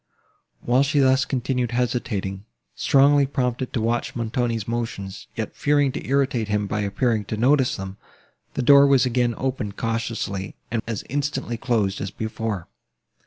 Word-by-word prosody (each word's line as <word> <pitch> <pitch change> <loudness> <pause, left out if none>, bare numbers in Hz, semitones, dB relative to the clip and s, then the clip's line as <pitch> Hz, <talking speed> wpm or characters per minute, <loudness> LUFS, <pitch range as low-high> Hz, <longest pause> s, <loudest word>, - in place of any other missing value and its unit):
While 125 +2 +3
she 145 +1 +1
thus 130 -1 +4
continued 125 -1 -1
hesitating, 110 -6 -2 0.3
strongly 140 0 +4
prompted 125 -2 -1
to 115 - 0
watch 115 +2 -1
Montoni's 115 -1 -1
motions, 115 -4 -4
yet 110 -2 -4
fearing 145 -2 +2
to - - -5
irritate 135 -5 +1
him 105 0 0
by 105 +1 -2
appearing 105 +1 0
to 110 - -4
notice 130 +2 +3
them, 95 0 -7 0.6
the 130 - -1
door 140 +2 +7
was 135 -3 +4
again 120 -1 +1
opened 125 -6 -3
cautiously, 115 -4 -3 0.2
and 115 -1 0
as 115 -4 -3
instantly 145 -3 -2
closed 110 -4 0
as 100 - -3
before. 110 -3 -4
120 Hz, 150 wpm, -23 LUFS, 110-130 Hz, 0.6 s, door